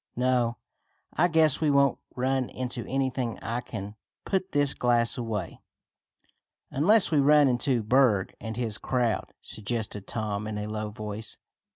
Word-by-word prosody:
No, 125 -2 +1 0.6
I 175 - +3
guess 160 -3 +3
we 155 - +3
won't 140 -1 +3 0.2
run 130 0 0
into 125 -2 -4
anything 130 -3 -1
and - - -16
I 115 +3 -2
can 105 -3 -7 0.3
put 190 -1 -1
this 145 -1 +3
glass 120 -1 +2
away." 110 -7 -4 1.1
"Unless 190 +9 +4
we 150 - +3
run 145 +1 +6
into 125 -1 +1
Berg 110 -4 +3
and 110 0 -5
his 115 -4 -1
crowd," 120 -6 -1
suggested 110 -2 -4
Tom 105 -2 -3
in 110 -1 -4
a 105 - -3
low 105 0 -4
voice. 105 +1 -6
120 Hz, 150 wpm, -27 LUFS, 110-135 Hz, 1.1 s, run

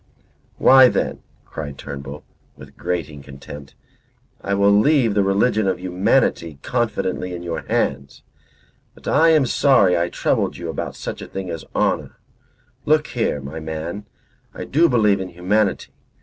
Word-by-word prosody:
"Why, 130 -1 +7
then," - - -2 0.2
cried 70 -3 -7
Turnbull, 70 +1 -8 0.3
with - - -14
grating 80 -5 -4
contempt. 70 0 -11 0.7
"I 100 - -1
will 100 +1 +4
leave 115 +2 +3
the 100 - +2
religion 100 +2 +1
of 95 -2 -1
humanity 90 - 0
confidently 100 -6 -2
in 85 - -8
your 85 -1 -4
hands; 70 0 -2 0.7
but - - -14
I 160 +3 +4
am 155 -4 +4
sorry 120 -8 +3
I 85 0 0
troubled - - -1
you - - -6
about - - -5
such - - -6
a - - -8
thing 95 -2 -6
as 80 - -6
honour. - - -1 0.7
Look 150 0 +2
here, 115 - -1
my 70 +4 -7
man. 80 +6 -6 0.5
I - - -6
do 165 +4 +3
believe 105 -5 +2
in 95 - -5
humanity. 95 +4 -1
95 Hz, 150 wpm, -21 LUFS, 80-115 Hz, 0.7 s, Why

